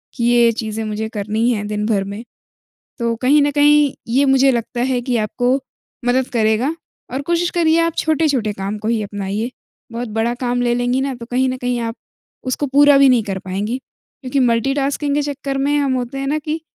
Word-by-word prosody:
कि 235 - -3
ये-ये 240 -1 +4
चीज़ें 220 -1 -4
मुझे 215 +1 -3
करनी 215 +2 -1
है, 210 -3 -1
दिन 210 0 -2
भर 205 -3 +1
में। 200 +4 -7 0.8
तो 235 -1 0
कहीं 285 +3 +5
न 290 - +2
कहीं 295 -1 +4 0.2
ये 275 +2 +4
मुझे 270 0 +4
लगता 240 0 -3
है, 250 0 +1
कि 245 0 -1
आपको 245 +4 +1 0.5
मदद 255 +1 +2
करेगा 225 +6 +1 0.4
और 270 +2 -2
कोशिश 345 +3 0
करिए 330 -2 +3
आप 335 -1 0
छोटे-छोटे 285 -8 +1
काम 200 +1 -4
को 215 +1 -4
ही 225 -2 +1
अपनाइए। 205 +3 -3 0.4
बहुत 235 0 -4
बड़ा 225 +2 0
काम 245 0 0
ले 240 0 +1
लेंगी 245 +2 0
ना, 270 0 -2
तो 235 -1 -9
कहीं 255 +1 +1
न 255 - -2
कहीं 245 -1 -2
आप 230 -1 -3 0.6
उसको 290 +3 -1
पूरा 285 +1 +5
भी 275 -1 +6
नहीं 245 -3 +4
कर 195 -2 -3
पाएँगी। 195 +5 -3 0.4
क्योंकि 265 +1 -1
मल्टी-टास्किंग 270 +4 +1
के 295 - +1
चक्कर 280 -1 -3
में 285 +2 +1
हम 275 -2 +1
होते 255 +1 -3
हैं 275 - -3
ना, 295 +3 0
कि 310 +2 -4
245 Hz, 205 wpm, -19 LUFS, 225-275 Hz, 0.8 s, भी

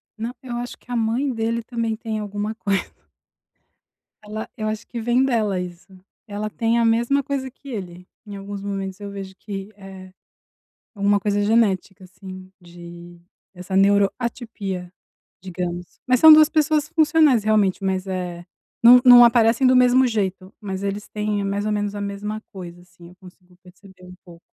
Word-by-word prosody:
Não, 230 +3 -5
eu 240 -2 -6
acho 245 0 -6
que - - -30
a 245 - -2
mãe 235 +4 0
dele 230 +1 -2
também 230 -1 -3
tem 220 -2 -4
alguma 205 +1 -4
coisa. 200 -3 -1 1.4
Ela 215 +1 -7
eu 215 - -3
acho 215 0 -5
que 235 - -6
vem 240 +3 +2
dela 215 -7 0
isso. 175 0 -8 0.4
Ela 210 0 -4
tem 230 +2 0
a 230 - +2
mesma 235 +5 +1
coisa 275 -2 -3
que 275 +2 -15
ele. 180 -5 -8 0.2
Em 205 -1 -9
alguns 200 0 -7
momentos 195 -1 -5
eu 200 -1 -7
vejo 195 -1 -8
que 195 -1 -7
é 190 -1 -12 0.8
alguma 200 0 +2
coisa 205 +1 -1
genética, 205 -3 +1
assim, 185 0 -12
de 175 0 -13 0.3
essa 185 +1 -6
neuroatipia, 200 -1 0 0.5
digamos. 180 -1 -6
Mas 255 -1 +3
são 315 0 +9
duas 310 -1 +8
pessoas 305 -1 +1
funcionais, 305 -7 +3
realmente, 210 -3 +1
mas, 190 0 -2
é, 180 -2 -5 0.4
não 245 +1 +9
não 245 -1 +10
aparecem 235 +2 +3
do 255 - +4
mesmo 250 +1 +4
jeito, 195 -4 -3
mas 195 -1 -6
eles 200 +1 -4
têm, 210 -1 -2
mais 200 +1 -2
ou 215 - -1
menos, 205 0 -2
a 205 - -5
mesma 205 +2 -5
coisa, 175 -2 -10
assim, 180 -1 -17
eu 180 - -18
consigo 180 -1 -18
perceber 185 0 -18
um 180 - -12
pouco. 170 -2 -15
205 Hz, 170 wpm, -21 LUFS, 190-230 Hz, 1.4 s, não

